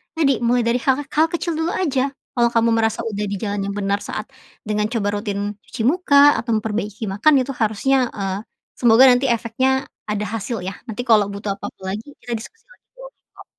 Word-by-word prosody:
Tadi, 275 -6 +2
mulai 240 +1 +3
dari 240 +2 +2
hal-hal 290 +3 +2
kecil 340 -1 -2
dulu 320 +2 -1
aja. 275 -6 0 0.2
Kalau 240 -1 +4
kamu 230 0 +3
merasa 225 -1 +1
udah 210 -2 -3
di 200 - -3
jalan 205 0 -3
yang 200 - -4
benar 200 0 0
saat 215 +1 -5 0.4
dengan 210 0 -1
coba 205 -3 -1
rutin 205 -1 -3 0.2
cuci 225 - -4
muka 285 0 +5
atau 230 -1 -1
memperbaiki 210 0 -3
makan 265 +7 +4
itu 270 - -5
harusnya, 245 +4 +1
eee, 195 -1 -3 0.4
semoga 235 +1 +5
nanti 250 +2 +2
efeknya 255 +3 +1 0.2
ada 210 0 -2
hasil, 225 -1 -4
ya. 190 - -4
Nanti 225 +2 -4
kalau 215 -3 +5
butuh 200 0 -4
apa-apa 190 -1 -7
lagi, 215 +5 -9 0.2
kita 240 - -4
diskusi 450 - -13
lagi - - -22
boleh - - -12 0.2
kok. - - -13
230 Hz, 190 wpm, -21 LUFS, 205-265 Hz, 0.4 s, muka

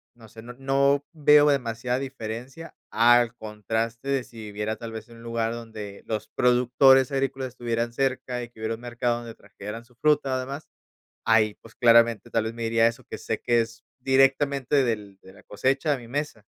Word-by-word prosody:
no 115 -2 -16
sé, 110 +1 -13
no 120 +2 -10
no 140 +2 +1
veo 150 -1 +5
demasiada 125 -1 -1
diferencia 130 +4 -7 0.2
al 120 +1 +4
contraste 110 +3 -4
de 135 -2 +1
si 115 - -17
viviera 105 0 -4
tal 115 0 -8
vez 110 -1 -8
en 115 - -14
un 115 - -14
lugar 115 -1 -2
donde 110 -4 -8
los 110 -2 -3
productores 125 +2 +4
agrícolas 135 -1 -2
estuvieran 120 -1 -3
cerca 130 -1 -1
y 120 - -9
que 120 - -20
hubiera 110 +1 -2
un 115 - -15
mercado 120 0 -1
donde 120 -1 -9
trajeran 105 +3 -9
su 125 - -26
fruta 140 -1 +2
o - - -1
demás, 135 +4 -6 0.6
ahí, 110 -2 +3
pues 115 - -16
claramente 115 -1 +4
tal 115 -1 0
vez 110 +1 -4
me 115 0 -5
iría 115 0 +2
a - - +7
eso 115 - -8
que - - -8
sé - - -3
que 120 -1 +2
es 115 +1 -5 0.2
directamente 135 +1 +2
del 105 -5 -3
de 95 - -15
la 100 - -18
cosecha 135 +8 0
a - - -2
mi 120 - -12
mesa. 140 -5 -4
120 Hz, 200 wpm, -25 LUFS, 115-135 Hz, 0.6 s, a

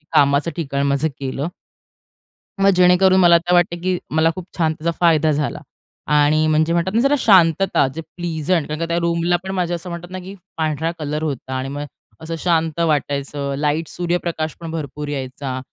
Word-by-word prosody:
कामाचं 140 +3 +3
ठिकाण 140 -4 -2
माझं 140 +3 +1
केलं. 135 +2 -3 1.1
मग 195 - +5
जेणेकरून 180 +1 +5
मला 170 -2 +7
तर 175 +1 -1
वाटते, 175 -1 +3
की 185 0 0
मला 160 +1 +3
खूप 185 -2 -7
छान 160 -2 +2
त्याचा 160 +2 -2
फायदा 160 -3 +4
झाला 150 0 -2 0.5
आणि 150 +1 +4
म्हणजे 155 +1 +2
म्हणतात 170 +2 0
ना, 230 - +3
जरा 275 +3 +3
शांतता. 185 - +4
जे 165 - -4
प्लिजंट 165 0 -2
कारण 155 0 -4
का 165 - -1
त्या 170 - 0
रूमला 170 +1 +1
पण 190 - -5
माझं 175 -1 0
असं 175 +1 -7
म्हणतात 170 +1 -7
ना, 185 - -5
की 185 +2 -9 0.2
पांढरा 160 0 -1
कलर 150 +1 -3
होता 135 -3 -4
आणि 130 +1 -4
मग 145 +1 -5 0.4
असं 165 +1 -5
शांत 165 -2 0
वाटायचं. 140 -3 -1
लाईट, 150 +2 0
सूर्यप्रकाशपण 170 -2 -3
भरपूर 150 -2 -5
यायचा 130 -2 -4
160 Hz, 175 wpm, -20 LUFS, 145-175 Hz, 1.1 s, मला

